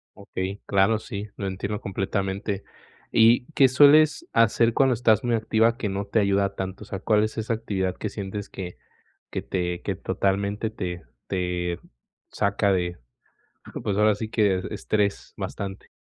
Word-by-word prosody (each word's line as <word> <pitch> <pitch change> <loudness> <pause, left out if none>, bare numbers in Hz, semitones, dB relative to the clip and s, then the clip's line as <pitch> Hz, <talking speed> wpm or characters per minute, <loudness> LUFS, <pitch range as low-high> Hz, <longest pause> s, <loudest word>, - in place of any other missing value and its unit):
Okey, 95 +2 -5
claro, 100 +3 +3
sí, 105 -2 -6
lo 100 - -4
entiendo 100 +2 -3
completamente, 95 0 -2 0.5
¿y 115 +2 +5
qué 135 -2 +6
sueles 150 - +6
hacer 115 +1 +3
cuando 135 -2 +4
estás 110 -3 +3
muy 120 -1 +1
activa 110 +1 +2
que 110 - -2
no 100 +1 -2
te 100 +3 0
ayuda 100 -1 +2
tanto?, 95 +1 -5
o 105 - -9
sea, 95 - -5
¿cuál 105 +2 +2
es 110 +1 -2
esa 110 +1 -1
actividad 95 -5 -2
que - - -3
sientes 100 0 -5
que 90 -2 -7 0.5
que - - -3
te 90 -1 -2
que - - -2
totalmente 100 +3 -1
te 90 -5 -5 0.2
te 90 -2 -2 0.5
saca 100 0 +1
de, 90 -2 -1 0.9
pues, 100 -1 -1
ahora 105 -1 +4
sí, 110 +1 -5
que 100 -5 +2
estrés 105 -1 -1
bastante. 95 -1 -5
100 Hz, 155 wpm, -25 LUFS, 95-110 Hz, 0.9 s, qué